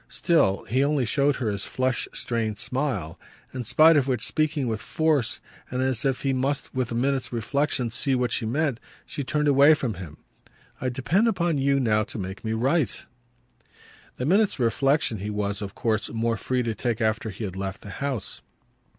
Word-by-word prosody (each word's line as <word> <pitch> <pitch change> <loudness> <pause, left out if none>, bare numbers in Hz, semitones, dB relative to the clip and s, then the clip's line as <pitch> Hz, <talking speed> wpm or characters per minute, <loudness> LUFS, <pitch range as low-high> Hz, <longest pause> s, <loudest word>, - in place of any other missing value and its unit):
Still 130 - +2
he 130 +6 +1
only 140 -3 +1
showed 140 +4 +2
her 115 -6 -1
his 100 -1 -3
flushed 130 -2 -1
strained 110 -3 -2
smile; 125 - -2 0.3
in 125 -2 -4
spite 160 +8 +6
of 140 -2 +2
which, 130 -2 0
speaking 155 -3 0
with 110 -1 -2
force 150 -4 +1 0.3
and 130 +1 -1
as 130 -1 +1
if 135 -2 0
he 135 -1 +1
must 135 +2 -1
with 130 -3 -1
a - - -2
minute's 135 +2 0
reflexion 125 +1 -1
see 130 +3 0
what 125 -2 0
she 115 - 0
meant, 140 0 0 0.3
she 145 - -5
turned 150 +2 0
away 145 +2 +6
from 125 -6 -2
him. 85 -5 -9 0.6
"I 130 - 0
depend 150 - +1
upon 175 -8 +1
you 140 0 +2
now 110 -4 +2
to - - -8
make 95 -1 -6
me 110 -1 -1
right!" 130 - 0 1.1
The 125 - -2
minute's 200 +6 +3
reflexion 130 -1 +1
he 105 +2 -4
was 105 -1 -2
of 100 -1 -6
course 110 -2 0
more 115 0 0
free 125 +4 -1
to 115 -1 -1
take 115 +1 -2
after 110 0 0
he 105 +3 -7
had 95 -3 -4
left 95 +1 -5
the 100 - -9
house. 135 -1 -4
125 Hz, 190 wpm, -25 LUFS, 110-140 Hz, 1.1 s, spite